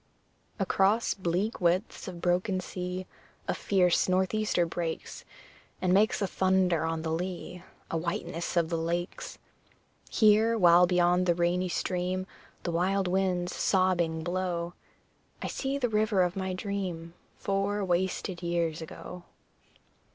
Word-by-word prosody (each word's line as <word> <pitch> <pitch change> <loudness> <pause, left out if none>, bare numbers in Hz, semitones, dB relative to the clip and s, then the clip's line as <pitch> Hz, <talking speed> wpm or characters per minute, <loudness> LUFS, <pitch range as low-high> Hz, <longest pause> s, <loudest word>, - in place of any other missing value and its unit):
Across 195 +2 +2
bleak 190 +4 -2
widths 180 +5 0
of 175 -2 -7
broken 185 +2 +1
sea 180 0 -5 0.4
A - - +1
fierce 180 -2 +2
north 185 +1 +2
easter 215 -5 +1
breaks, 165 -1 -4 0.6
And 185 -1 +2
makes 210 +1 +3
a - - +1
thunder 185 -4 +2
on 165 0 -2
the 160 - -2
lea 180 +1 -4 0.3
A 165 - 0
whiteness 170 0 -3
of 165 -1 +2
the 165 -2 -1
lakes. 170 +2 -3 0.7
Here, 220 +1 +4
while 175 -2 +6
beyond 180 0 +3
the 175 - +3
rainy 175 +1 +1
stream 185 +1 -1 0.4
The 175 - -2
wild 190 +3 +1
winds 180 -1 0
sobbing 175 -4 +1
blow, 175 -1 -2 0.7
I - - -5
see 270 0 -2
the 255 -3 +1
river 215 -3 +2
of 180 +1 -1
my 190 -1 -2
dream 185 -4 -4 0.2
Four 200 +1 -1
wasted 180 0 -1
years 170 -2 -1
ago. 175 +2 -9
180 Hz, 135 wpm, -29 LUFS, 175-190 Hz, 0.7 s, while